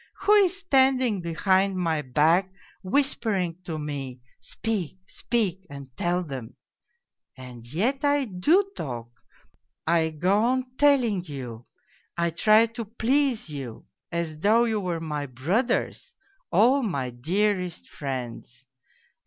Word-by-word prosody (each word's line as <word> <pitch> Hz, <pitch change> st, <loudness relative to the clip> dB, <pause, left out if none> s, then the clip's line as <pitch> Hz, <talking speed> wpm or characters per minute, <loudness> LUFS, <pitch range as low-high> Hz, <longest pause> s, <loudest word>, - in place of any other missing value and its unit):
Who 415 Hz, -, +4 dB
is 390 Hz, -3 st, +4 dB
standing 260 Hz, -, +2 dB
behind 190 Hz, +3 st, +1 dB
my 165 Hz, -4 st, 0 dB
back 160 Hz, +8 st, +2 dB, 0.3 s
whispering 195 Hz, -, 0 dB
to 160 Hz, -3 st, -4 dB
me, 140 Hz, -4 st, -5 dB
' -, -, -35 dB
Speak, 200 Hz, -7 st, -4 dB
speak 190 Hz, -4 st, -2 dB
and 140 Hz, -3 st, -10 dB
tell 175 Hz, +1 st, 0 dB
them 135 Hz, -7 st, -7 dB, 0.4 s
'? 475 Hz, -, -46 dB
And 125 Hz, -2 st, -10 dB
yet 245 Hz, -, 0 dB
I 285 Hz, -1 st, +2 dB
do 300 Hz, -, +2 dB
talk, 120 Hz, -4 st, -6 dB, 0.7 s
I 165 Hz, -1 st, +2 dB
go 180 Hz, +6 st, +1 dB
on 255 Hz, +2 st, 0 dB
telling 255 Hz, -10 st, +3 dB
you, 125 Hz, -6 st, -7 dB, 0.5 s
I 170 Hz, 0 st, +1 dB
try 215 Hz, +6 st, +5 dB
to 230 Hz, 0 st, -6 dB
please 240 Hz, +2 st, 0 dB
you 135 Hz, -6 st, -7 dB, 0.3 s
as 170 Hz, -3 st, -3 dB
though 220 Hz, +7 st, +4 dB
you 220 Hz, -2 st, 0 dB
were 180 Hz, -4 st, -2 dB
my 150 Hz, -3 st, -4 dB
brothers, 195 Hz, -, -1 dB, 0.4 s
all 240 Hz, +10 st, +4 dB
my 140 Hz, -, -2 dB
dearest 180 Hz, -, -1 dB
friends. 125 Hz, -2 st, -6 dB
180 Hz, 130 wpm, -26 LUFS, 150-235 Hz, 0.7 s, try